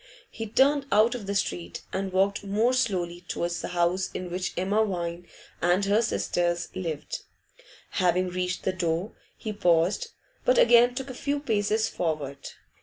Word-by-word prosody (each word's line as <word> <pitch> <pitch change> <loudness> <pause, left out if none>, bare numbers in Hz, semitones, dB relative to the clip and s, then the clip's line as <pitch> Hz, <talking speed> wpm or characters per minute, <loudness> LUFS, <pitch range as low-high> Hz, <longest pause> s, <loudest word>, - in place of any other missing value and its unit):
He 225 - -5
turned 275 +5 +3
out 215 +3 +5
of 230 -6 -6
the 200 - -2
street, 85 - -2
and 190 0 -2
walked 195 +2 +1
more 215 +5 +2
slowly 180 -9 0
towards 170 0 -2
the - - -4
house 180 +1 +1
in 180 -1 -4
which 180 +1 -2
Emma 200 +4 +2
Vine 175 -3 -3 0.3
and 175 +3 +3
her 205 +3 +3
sisters 175 -5 0
lived. 165 -5 -4 0.7
Having 185 0 +2
reached 180 +1 -2
the 190 - 0
door, 175 +3 -1 0.3
he 215 -2 -4
paused, 180 - +2 0.4
but - - +3
again 245 - +6
took 265 0 -4
a - - -7
few 285 +3 -2
paces 220 -4 +1
forward. 150 -5 -3
190 Hz, 160 wpm, -27 LUFS, 175-220 Hz, 0.7 s, again